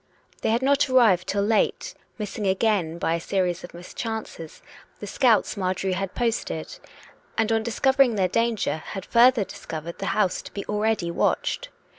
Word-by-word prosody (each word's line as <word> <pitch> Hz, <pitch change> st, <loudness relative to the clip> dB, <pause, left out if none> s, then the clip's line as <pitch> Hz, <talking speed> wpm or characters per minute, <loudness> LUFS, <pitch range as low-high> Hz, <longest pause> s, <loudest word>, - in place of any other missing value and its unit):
They -, -, 0 dB
had 230 Hz, +3 st, +1 dB
not 280 Hz, +1 st, +3 dB
arrived 220 Hz, -9 st, +4 dB
till 200 Hz, 0 st, 0 dB
late, 215 Hz, +1 st, +1 dB, 0.2 s
missing 210 Hz, -1 st, -4 dB
again, 190 Hz, -4 st, +1 dB
by 165 Hz, -, 0 dB
a 170 Hz, -, 0 dB
series 180 Hz, 0 st, -1 dB
of 175 Hz, -, -9 dB
mischances, 185 Hz, -2 st, -7 dB, 0.4 s
the -, -, -6 dB
scouts 225 Hz, 0 st, +2 dB
Marjorie 185 Hz, -1 st, -1 dB
had 190 Hz, 0 st, -3 dB
posted; 225 Hz, -, -2 dB, 0.6 s
and, 225 Hz, 0 st, +1 dB
on 225 Hz, 0 st, +2 dB
discovering 250 Hz, +2 st, +2 dB
their 190 Hz, -3 st, +2 dB
danger, 230 Hz, -3 st, 0 dB
had 190 Hz, +4 st, -7 dB
further 240 Hz, -1 st, +5 dB
discovered 165 Hz, -2 st, -8 dB
the -, -, -3 dB
house 195 Hz, -4 st, +1 dB
to -, -, -11 dB
be 200 Hz, -, -5 dB
already 210 Hz, -4 st, 0 dB
watched. -, -, -1 dB
205 Hz, 160 wpm, -24 LUFS, 180-230 Hz, 0.6 s, further